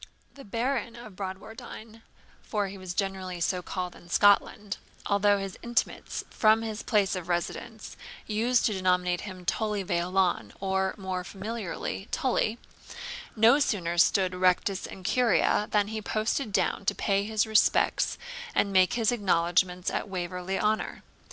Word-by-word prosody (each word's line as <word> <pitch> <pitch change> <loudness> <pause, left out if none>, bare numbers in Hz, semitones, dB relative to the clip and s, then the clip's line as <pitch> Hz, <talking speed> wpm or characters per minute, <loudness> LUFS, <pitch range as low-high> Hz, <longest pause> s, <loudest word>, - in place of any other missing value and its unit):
The 275 - -12
Baron 235 +2 -2
of 235 -5 -11
Bradwardine, 220 +4 -8 0.4
for 205 -3 -2
he 195 - -8
was 185 -1 -6
generally 190 -3 -2
so 180 +2 0
called 180 0 -4
in 175 - -16
Scotland 205 +1 +3 0.3
(although 205 0 +3
his 195 -1 -5
intimates, 235 0 -2
from 220 +1 +4
his 220 -1 -4
place 205 -4 +2
of 180 -1 -6
residence, 210 +6 -3 0.3
used 230 +3 +2
to 215 - +2
denominate 180 -2 +1
him 185 -3 -8
Tully 210 +2 0
Veolan, 175 - 0
or 190 0 0
more 185 -2 -3
familiarly, 200 0 -5
Tully), 235 -3 0 0.8
no 230 +5 +6
sooner 175 - 0
stood 185 +1 +4
rectus 185 +1 +1
in 190 - -10
curia 210 -1 +2
than 205 -1 +2
he 220 0 -4
posted 215 +3 -1
down 200 - +1
to - - +1
pay 200 -1 +1
his 215 +1 +1
respects 220 -1 +3 0.4
and 200 -1 +2
make 185 -1 +5
his 230 -2 +2
acknowledgments 180 -4 +1
at - - -3
Waverley 180 +1 -3
Honour. 215 +1 -1
200 Hz, 145 wpm, -28 LUFS, 185-220 Hz, 0.8 s, no